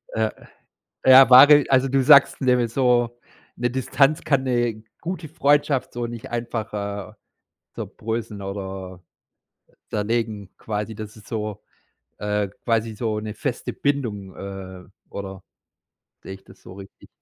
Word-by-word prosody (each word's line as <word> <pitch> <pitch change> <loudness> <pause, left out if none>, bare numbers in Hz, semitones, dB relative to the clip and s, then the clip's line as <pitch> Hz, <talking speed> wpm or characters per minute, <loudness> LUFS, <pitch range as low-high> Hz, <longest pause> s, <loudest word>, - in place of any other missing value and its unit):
Ja. 110 -1 0 0.7
Ja, 130 -1 +8
wahre 145 +3 +9
also, 135 0 +3
du 135 0 +2
sagst 140 +2 +6
nämlich 125 -3 +1
so, 120 -2 +1 0.4
'ne 120 0 -1
Distanz 135 +4 +1
kann 140 -3 +1
'ne 120 -3 -1 0.2
gute 165 -2 -5
Freundschaft 145 -2 +1
so 120 0 -3
nicht 120 +2 -8
einfach, 115 -2 -4
äh, 100 0 -5 0.6
zerbröseln 110 -2 -5
oder 95 -2 -7 0.9
zerlegen 105 -2 -2
quasi, 105 0 -4
das 110 0 -8
ist 110 - -16
so 105 -2 -5 0.6
äh, 105 -1 -1 0.2
quasi 115 -1 0
so 110 -1 -2
'ne 105 -1 -6
feste 120 +2 -4
Bindung, 110 -10 -2
ähm, 95 -1 -9 0.2
oder 95 -1 -7 0.8
sehe 95 - -8
ich 95 - -16
das - - -18
so 90 - -12
richtig? 100 0 -14
115 Hz, 130 wpm, -23 LUFS, 105-130 Hz, 0.9 s, wahre